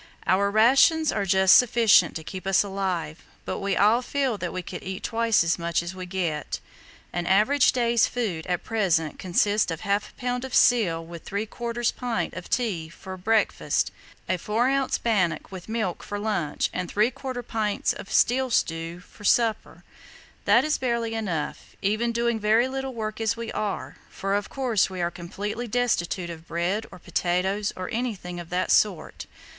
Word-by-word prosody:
"Our 200 Hz, +2 st, +3 dB
rations 270 Hz, +9 st, +5 dB
are 200 Hz, -2 st, -1 dB
just 190 Hz, 0 st, +6 dB
sufficient 230 Hz, -7 st, +5 dB
to 160 Hz, -, -5 dB
keep 185 Hz, +3 st, -7 dB
us 195 Hz, +1 st, +4 dB
alive, 190 Hz, -6 st, -3 dB, 0.2 s
but -, -, -3 dB
we 195 Hz, -1 st, -1 dB
all 215 Hz, +4 st, +4 dB
feel 265 Hz, -2 st, -1 dB
that 180 Hz, -1 st, -3 dB
we 185 Hz, -1 st, -4 dB
could 180 Hz, -, -7 dB
eat 190 Hz, +2 st, -6 dB
twice 230 Hz, -4 st, +2 dB
as 165 Hz, +1 st, 0 dB
much 170 Hz, 0 st, 0 dB
as 170 Hz, +2 st, -5 dB
we 185 Hz, -1 st, -7 dB
get. 170 Hz, -5 st, -2 dB, 0.5 s
An 175 Hz, -1 st, -2 dB
average 215 Hz, +9 st, +4 dB
day's 235 Hz, -2 st, +2 dB
food 200 Hz, -10 st, -3 dB
at 180 Hz, -1 st, -1 dB
present 175 Hz, -9 st, 0 dB
consists 205 Hz, +3 st, +2 dB
of 165 Hz, -2 st, -4 dB
½ 200 Hz, +1 st, 0 dB
lb. 250 Hz, -1 st, -2 dB
of 265 Hz, -1 st, -4 dB
seal 175 Hz, -9 st, +4 dB
with 170 Hz, 0 st, -10 dB
¾ 230 Hz, +3 st, -2 dB
pint 245 Hz, -2 st, -2 dB
of 185 Hz, -, -8 dB
tea 195 Hz, -10 st, -1 dB
for 190 Hz, +3 st, -9 dB
breakfast, 215 Hz, +4 st, +1 dB, 0.4 s
a 185 Hz, -, +1 dB
4 230 Hz, +7 st, +1 dB
oz. 275 Hz, -1 st, +1 dB
bannock 200 Hz, -8 st, 0 dB
with 185 Hz, +1 st, -9 dB
milk 220 Hz, -6 st, -2 dB
for 205 Hz, -, -5 dB
lunch, 205 Hz, -8 st, -1 dB
and 180 Hz, -2 st, -3 dB
¾ 245 Hz, +3 st, -1 dB
pint 215 Hz, -2 st, 0 dB
of -, -, -10 dB
seal 260 Hz, +2 st, +3 dB
stew 165 Hz, -4 st, -1 dB
for 205 Hz, -, -17 dB
supper. 225 Hz, +1 st, +1 dB, 0.6 s
That -, -, +5 dB
is 305 Hz, -, 0 dB
barely 235 Hz, -3 st, -1 dB
enough, 180 Hz, -9 st, -4 dB
even 215 Hz, +4 st, +1 dB
doing 235 Hz, -1 st, 0 dB
very 220 Hz, +4 st, +3 dB
little 265 Hz, -1 st, -4 dB
work 215 Hz, -1 st, -4 dB
as 225 Hz, +1 st, 0 dB
we 230 Hz, -1 st, -5 dB
are, 210 Hz, -2 st, -3 dB
for 195 Hz, 0 st, -3 dB
of 205 Hz, 0 st, -1 dB
course 245 Hz, -8 st, +1 dB
we 185 Hz, -1 st, -6 dB
are 170 Hz, 0 st, 0 dB
completely 205 Hz, +7 st, -5 dB
destitute 200 Hz, -7 st, 0 dB
of 165 Hz, 0 st, -11 dB
bread 175 Hz, +6 st, -1 dB
or -, -, -10 dB
potatoes 185 Hz, +4 st, -1 dB
or 185 Hz, 0 st, -5 dB
anything 210 Hz, -7 st, -3 dB
of 170 Hz, -1 st, -9 dB
that 180 Hz, +1 st, 0 dB
sort. 190 Hz, -7 st, +1 dB
205 Hz, 175 wpm, -25 LUFS, 180-235 Hz, 0.6 s, just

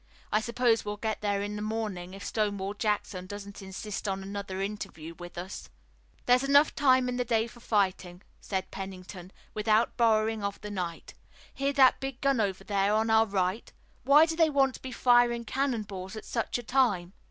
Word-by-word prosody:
I 215 Hz, -, +3 dB
suppose 235 Hz, 0 st, +1 dB
we'll 205 Hz, 0 st, -4 dB
get 220 Hz, 0 st, -3 dB
there 200 Hz, -1 st, 0 dB
in 205 Hz, 0 st, -4 dB
the 210 Hz, -, -4 dB
morning, 210 Hz, -4 st, -4 dB
if 195 Hz, -, -9 dB
Stonewall 205 Hz, -2 st, -1 dB
Jackson 205 Hz, -4 st, -2 dB
doesn't 200 Hz, +1 st, -8 dB
insist 195 Hz, +2 st, -6 dB
on 195 Hz, 0 st, -2 dB
another 195 Hz, -1 st, -5 dB
interview 195 Hz, -5 st, -5 dB
with 175 Hz, 0 st, -10 dB
us." 185 Hz, +3 st, -7 dB, 0.6 s
"There's 250 Hz, +1 st, +4 dB
enough 285 Hz, +2 st, +5 dB
time 260 Hz, -3 st, +4 dB
in 250 Hz, 0 st, -2 dB
the 250 Hz, -, +1 dB
day 225 Hz, -2 st, +1 dB
for 235 Hz, +1 st, -13 dB
fighting," 190 Hz, -4 st, -1 dB, 0.2 s
said 190 Hz, -2 st, -4 dB
Pennington, 185 Hz, -1 st, -8 dB, 0.2 s
"without 215 Hz, +1 st, +2 dB
borrowing 220 Hz, -2 st, +2 dB
of 200 Hz, 0 st, -3 dB
the 210 Hz, -, -6 dB
night. 180 Hz, -4 st, -5 dB, 0.4 s
Hear 275 Hz, +1 st, 0 dB
that 265 Hz, -2 st, +5 dB
big 270 Hz, -1 st, -5 dB
gun 275 Hz, -4 st, +2 dB
over 195 Hz, -2 st, -2 dB
there 200 Hz, 0 st, +1 dB
on 220 Hz, +1 st, +1 dB
our 220 Hz, 0 st, +5 dB
right! 190 Hz, +2 st, -1 dB, 0.3 s
Why 290 Hz, +4 st, +6 dB
do 325 Hz, 0 st, -3 dB
they 325 Hz, -1 st, +4 dB
want 270 Hz, -2 st, +3 dB
to -, -, -11 dB
be 260 Hz, -, -6 dB
firing 240 Hz, -1 st, +3 dB
cannon 260 Hz, -2 st, -1 dB
balls 190 Hz, -1 st, -7 dB
at 215 Hz, -, -8 dB
such 230 Hz, 0 st, -2 dB
a 245 Hz, -, -7 dB
time?" 215 Hz, -8 st, +1 dB
215 Hz, 190 wpm, -29 LUFS, 195-240 Hz, 0.6 s, Why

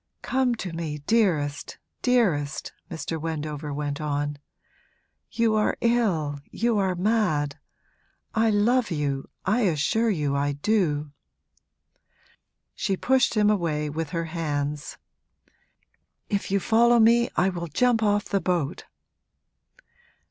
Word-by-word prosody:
'Come 260 Hz, -2 st, +1 dB
to 185 Hz, -6 st, -6 dB
me, 160 Hz, -3 st, -4 dB
dearest, 160 Hz, -11 st, +1 dB, 0.2 s
dearest!' 185 Hz, -, +1 dB, 0.2 s
Mr. 160 Hz, 0 st, -4 dB
Wendover 150 Hz, -2 st, -4 dB
went 145 Hz, 0 st, -3 dB
on. 145 Hz, -1 st, -2 dB, 0.9 s
'You 230 Hz, -2 st, +1 dB
are 215 Hz, -1 st, +1 dB
ill, 185 Hz, -12 st, +1 dB
you 230 Hz, -2 st, 0 dB
are 190 Hz, -2 st, +1 dB
mad! 175 Hz, -8 st, 0 dB, 0.7 s
I 225 Hz, 0 st, +3 dB
love 225 Hz, +4 st, +2 dB
you 145 Hz, -5 st, -2 dB, 0.2 s
I 215 Hz, +6 st, +2 dB
assure 210 Hz, +5 st, +1 dB
you 150 Hz, -8 st, 0 dB
I 145 Hz, +1 st, 0 dB
do!' 150 Hz, -3 st, 0 dB, 1.6 s
She 195 Hz, -, -1 dB
pushed 260 Hz, +1 st, +2 dB
him 210 Hz, 0 st, +4 dB
away 155 Hz, -6 st, -1 dB
with 160 Hz, 0 st, -3 dB
her 165 Hz, 0 st, -2 dB
hands. 150 Hz, -3 st, -3 dB, 1.3 s
'If 200 Hz, -2 st, -1 dB
you 200 Hz, +1 st, +2 dB
follow 235 Hz, +4 st, +4 dB
me 235 Hz, +2 st, +5 dB
I 185 Hz, +2 st, +3 dB
will 175 Hz, -2 st, -4 dB
jump 240 Hz, -, +2 dB
off 205 Hz, -1 st, +2 dB
the 195 Hz, -, -1 dB
boat!' 170 Hz, -3 st, -1 dB
175 Hz, 120 wpm, -25 LUFS, 150-220 Hz, 1.6 s, me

